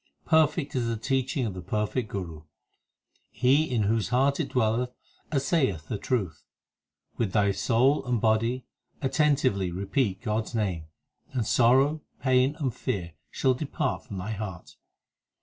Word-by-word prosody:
Perfect 160 -2 +2
is 120 -2 0
the 115 -1 -1
teaching 130 +3 0
of 105 - -3
the 90 - -7
perfect 105 +4 -2
Guru; 85 -6 -5 0.9
He 135 +6 +2
in 120 -4 +1
whose 110 +1 +1
heart 135 +3 +2
it - - -1
dwelleth 120 +1 +1 0.4
assay 140 0 +2
eth 80 -3 -10
the 105 - -2
truth. 95 - -2 0.7
With 105 -6 -1
thy 100 -2 +3
soul 130 +8 +2
and 125 -2 0
body 115 +3 +1 0.4
attentively 135 - +2
repeat 100 +3 -1
God 110 -1 0
s 120 - -8
name, 95 -8 -1 0.5
And 120 -4 0
sorrow, 135 +7 +4 0.2
pain, 130 +2 +3
and 135 -7 -1
fear 85 -7 -3 0.2
shall 130 - +2
depart 145 +1 -2
from 100 - -6
thy 95 +4 -4
heart. 95 -4 -6
120 Hz, 150 wpm, -27 LUFS, 100-135 Hz, 0.9 s, sorrow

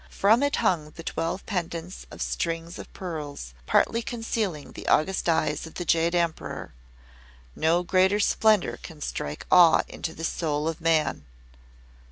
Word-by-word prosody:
From 220 +5 +3
it 285 0 +2
hung 155 -4 +1
the 165 - -9
twelve 165 +4 -3
pendants 175 -2 -4
of - - -5
strings 165 0 -3
of - - -10
pearls, 150 - -6
partly 230 - +3
concealing 225 -9 -3
the - - -9
august 185 +2 +2
eyes 155 -1 0
of 160 - -14
the 175 - -4
Jade 165 +1 +2
Emperor. 170 -2 -2 0.8
No 165 +3 +2
greater 190 +3 +3
splendour 215 -1 +3
can 160 -3 -11
strike 75 - -4
awe 175 -3 +7
into 160 - -6
the 165 - -8
soul 155 -2 -1
of 165 +1 -3
man. 160 - +1
170 Hz, 150 wpm, -26 LUFS, 160-185 Hz, 0.8 s, awe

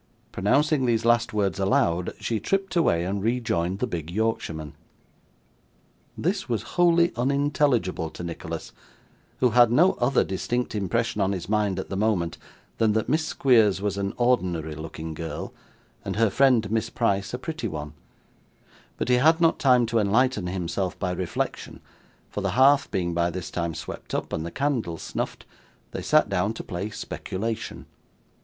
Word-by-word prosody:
Pronouncing 140 - +2
these 115 -1 +1
last 120 0 +3
words 100 -2 0
aloud, 90 -2 +1
she 115 -2 -1
tripped 195 - -1
away 85 - +2
and 100 +2 -2
rejoined 100 -6 0
the 115 - 0
big 85 -8 -5
Yorkshireman. 85 -7 -2 1.4
This 185 -2 -1
was 115 -3 -1
wholly 170 0 +4
unintelligible 135 - +1
to 90 - -9
Nicholas, 85 -1 -6 0.7
who 125 -2 +4
had 120 0 +6
no 175 +10 +5
other 125 +3 +3
distinct 120 +6 -2
impression 105 +1 -1
on 95 0 +1
his 90 -2 -5
mind 105 -2 +1
at - - -5
the - - -3
moment, 95 -5 0 0.4
than 110 -2 +3
that 110 +2 0
Miss 155 +3 +2
Squeers 115 -11 +3
was 100 -1 -1
an 100 +1 -3
ordinary 90 -11 +1
looking 80 +1 -7
girl, 80 +1 -6 0.5
and - - -4
her 110 -1 +3
friend 125 -6 +3
Miss 115 0 0
Price 100 -5 0
a 125 - -3
pretty 155 -2 -4
one; 75 -4 -6 1.0
but - - -2
he 125 0 +4
had 160 +6 +4
not 165 -2 +3
time 125 -5 +4
to 115 0 +1
enlighten 110 -1 +2
himself 90 +1 -2
by 90 -2 -2
reflection, 90 -1 -3 0.5
for - - -5
the - - -1
hearth 140 +2 +5
being 90 -4 -1
by 85 0 +1
this 90 +1 -6
time 85 -2 -2
swept - - -6
up, - - -3
and 80 +1 -2
the - - -4
candle 125 - -1
snuffed, - - -5 0.5
they - - -5
sat 155 -3 +3
down 100 +2 0
to - - -6
play 95 +2 -4
speculation. 110 +1 -5
110 Hz, 165 wpm, -25 LUFS, 90-125 Hz, 1.4 s, had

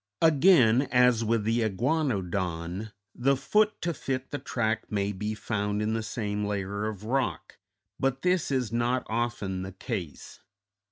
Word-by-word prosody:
Again, 140 -6 +5
as 125 -2 +4
with 115 -1 +1
the 115 +2 +1
iguanodon, 100 - -1 0.2
the 135 +2 +2
foot 210 +10 +2
to 170 0 0
fit 130 -2 -4
the 145 - -3
track 110 -2 -2
may 100 -1 0
be 105 +2 -3
found 105 -1 -2
in 105 +1 0
the 115 - -1
same 105 -1 -3
layer 100 0 -2
of 105 -2 -6
rock, 115 - -2 0.4
but 135 0 0
this 180 -2 +2
is 130 -5 0
not 120 +2 0
often 110 -5 -2
the 95 0 -6
case. 95 - -6
115 Hz, 150 wpm, -28 LUFS, 105-130 Hz, 0.4 s, Again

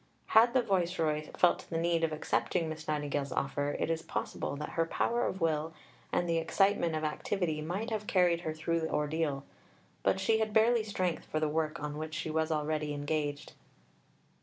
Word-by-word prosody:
Had 235 +3 +6
the 255 - +4
Viceroy 170 -6 0
felt 180 - +3
the 165 - -2
need 165 0 +1
of 165 - +2
accepting 160 +2 0
Miss 155 0 -6
Nightingale's 145 -2 -1
offer, 145 +2 -1
it - - 0
is 165 0 -1
possible 160 -3 -3
that 150 +1 -5
her 165 0 0
power 235 +7 +1
of 190 - -4
will 160 0 0 0.4
and 175 - +1
the 165 -1 +2
excitement 170 0 +2
of 155 - -2
activity 155 +1 -1
might 190 +9 -3
have 210 -1 -2
carried 175 -3 +3
her 160 - -2
through 165 +1 0
the 160 -1 -2
ordeal; 150 -2 0 0.6
but 190 - +2
she 220 +3 +2
had 220 -1 -1
barely 225 +1 +4
strength 185 -5 -2
for 155 - -2
the 155 - +1
work 155 0 -1
on 150 0 -4
which 155 0 -5
she 155 -1 -3
was 160 0 0
already 150 -1 -1
engaged. 145 0 -2
160 Hz, 185 wpm, -31 LUFS, 150-180 Hz, 0.6 s, Had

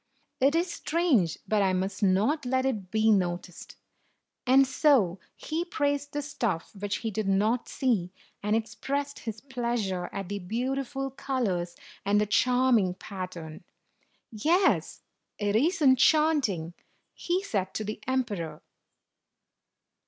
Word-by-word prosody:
It 275 +4 +3
is 345 +1 0
strange, 295 - +1
but 215 -1 +2
I 190 -1 +2
must 190 +1 -2
not 210 +11 +2
let 260 +1 0
it 210 -9 -2
be 220 +1 +3
noticed." 180 -3 -2 0.7
And 270 +2 +6
so 255 - +3 0.2
he 320 +2 -3
praised 285 -4 -1
the 290 0 -2
stuff 230 - -2
which 200 0 -2
he 220 - 0
did 215 0 -2
not 210 +5 +1
see, 215 -10 0 0.3
and 210 +1 +1
expressed 270 +6 -3
his 225 -1 -6
pleasure 235 -9 -2
at 195 -2 -5
the 200 +1 -4
beautiful 265 +7 -3
colors 205 -11 -2 0.3
and 205 +1 +3
the 210 - +2
charming 240 -3 +3
pattern. 180 -5 -7 0.7
"Yes, 330 - +1 0.3
it 205 -1 0
is 315 +8 +2
enchant 295 +1 +4
ing," 170 -2 -5 0.4
he 360 +2 -1
said 190 - -2
to 215 - -2
the 215 +1 -5
emperor. 205 -12 -2
225 Hz, 130 wpm, -28 LUFS, 195-270 Hz, 0.7 s, And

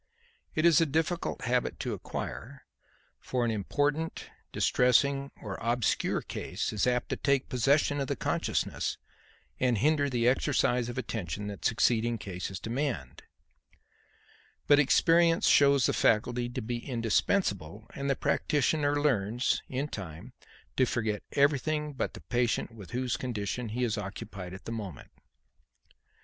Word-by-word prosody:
It 155 - +2
is 170 -2 +6
a 165 - +3
difficult 160 +4 -1
habit 125 0 0
to - - -2
acquire; - - -6 0.5
for 125 -2 -1
an 115 - +1
important, 145 +9 -1 0.2
distressing 135 +3 +2
or 100 -4 -5
obscure 120 0 0
case - - -4
is 105 +3 +1
apt 125 -1 0
to - - 0
take 140 -2 +1
possession 140 +3 +2
of 135 - -1
the - - -1
consciousness - - -1 0.6
and 125 -3 +2
hinder 145 +4 +2
the 120 -2 +1
exercise 125 -2 +2
of 120 - -6
attention 105 - -4
that 100 - -8
succeeding 115 0 +2
cases 95 -1 -5
demand; 115 - -3 1.4
but 145 0 +6
experience 165 +4 +4
shows 140 -2 +5
the - - +2
faculty 120 +2 +2
to 120 0 -5
be 120 +1 -3
indispensable, 110 - 0
and 140 0 -3
the 135 - +2
practitioner 145 +1 +1
learns 120 -4 +1
in 135 +3 -2
time 95 - -8 0.4
to 130 - +4
forget 110 -4 -1
everything 150 +1 +1
but 135 - -3
the - - -10
patient 120 -1 0
with 100 -5 -11
whose 125 -1 -1
condition 115 -1 -3
he 125 +4 -2
is 115 -3 0
occupied 95 -2 -7
at 95 - -12
the - - -5
moment. 100 - -7
125 Hz, 140 wpm, -29 LUFS, 110-140 Hz, 1.4 s, is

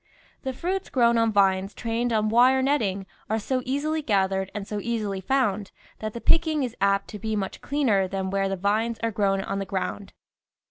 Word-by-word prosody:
The 265 - -3
fruits 365 +8 -3
grown 235 -2 +3
on 230 -1 +3
vines 195 -1 +2
trained 235 +1 -1
on 215 -1 +2
wire 255 +4 +5
net 285 +2 +3
ting 195 -2 -2 0.2
are 220 - +1
so 255 +4 -1
easily 300 +4 -1
gathered 190 -5 +1
and 205 -1 -4
so 210 - -3
easily 210 -4 -2
found 210 -4 0 0.3
that 215 0 -4
the 235 - -5
picking 315 +1 +2
is 245 -3 -4
apt 200 0 +2
to 210 - -7
be 220 +1 -2
much 195 -2 -4
cleaner 235 -10 +1
than 190 0 -3
where 195 0 0
the 195 - -1
vines 215 +4 0
are 230 - +1
grown 195 -2 +1
on 195 - -3
the - - -1
ground. 195 +1 -4
215 Hz, 200 wpm, -25 LUFS, 195-250 Hz, 0.3 s, wire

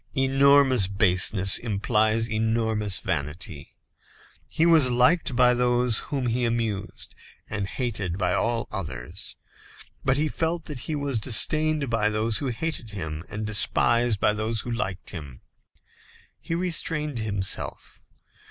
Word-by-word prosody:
Enormous 135 -4 +4
baseness 95 0 +3
implies 110 +1 +1
enormous 110 -2 -1
vanity. 75 -3 -4 0.7
He 160 - +1
was 160 -6 +5
liked 125 +4 +2
by 125 0 +5
those 125 -1 +2
whom 135 -3 -2
he 120 +1 0
amused, 115 -4 -2 0.3
and 100 -2 -3
hated 100 -8 -3
by 90 -3 0
all 115 0 0
others; 75 - -5 0.7
but 135 0 +2
he 155 +2 +1
felt 165 +2 -2
that 145 -4 -6
he 155 - -1
was 140 -5 -1
disdained 150 +4 +2
by 105 -2 +2
those 110 +1 +1
who 140 - -3
hated 130 -1 -3
him, 80 -6 -5
and 105 +1 -5
despised 115 +1 +2
by 105 - +3
those 110 0 -2
who 120 - -6
liked 95 -5 -4
him. 75 -8 -9 1.0
He 165 - -4
restrained 165 -6 -1
himself. 100 -3 -3
115 Hz, 130 wpm, -25 LUFS, 100-130 Hz, 1.0 s, was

